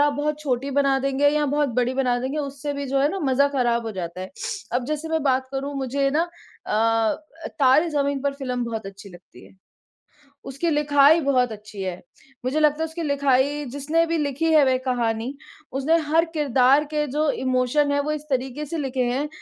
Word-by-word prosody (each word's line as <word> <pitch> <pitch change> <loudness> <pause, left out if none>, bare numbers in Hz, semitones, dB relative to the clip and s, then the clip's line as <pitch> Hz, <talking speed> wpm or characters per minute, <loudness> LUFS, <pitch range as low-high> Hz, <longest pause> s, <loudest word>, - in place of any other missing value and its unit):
आप 290 0 +4
बहुत 295 +1 -2
छोटी 275 -2 -2
बना 275 -1 +3
देंगे 275 +1 +2
या 300 +1 +1
बहुत 290 +1 +1
बड़ी 250 +1 +1
बना 250 -2 +1
देंगे, 265 +4 -3
उससे 285 0 -4
भी 280 0 -4
जो 270 +1 0
है 285 - +3
ना 390 - -3
मजा 280 0 +3
खराब 240 -4 +1
हो 220 - -4
जाता 180 -2 -6
है। 185 - -6 0.4
अब 245 +1 0
जैसे 305 +2 -3
मैं 320 -1 0
बात 260 -2 +1
करूँ 275 +1 -3
मुझे 275 +1 0
ना 325 +5 +1 0.4
अ - - -6
अ, 225 +9 0
तारे 280 +4 +4
ज़मीन 280 -2 0
पर 280 0 0
फ़िल्म 250 -3 -3
बहुत 225 -3 -5
अच्छी 195 +1 -10
लगती 175 -1 -16
है। - - -20 1.0
उसकी 275 +6 -2
लिखाई 295 +1 +5
बहुत 255 -4 +2
अच्छी 210 -1 -9
है, 185 -2 -4 0.4
मुझे 270 +5 0
लगता 300 0 +2
है - - +1
उसकी 325 +1 -6
लिखाई 285 0 +1
जिसने 300 +5 +1
भी 330 0 -1
लिखी 290 +1 -1
है 305 -2 +6
वह 260 -1 +3
कहानी, 235 -1 -1 0.4
उसने 275 +5 +2
हर 325 +3 +3
किरदार 275 -2 +3
के 300 0 +1
जो 300 +3 0 0.2
इमोशन 255 +3 +2
हैं 285 - +1
वो 300 +2 -2
इस 305 -1 -4
तरीके 265 +2 -2
से 330 +3 -5
लिखे 265 -3 -1
हैं 280 +4 -1
275 Hz, 205 wpm, -23 LUFS, 255-295 Hz, 1.0 s, है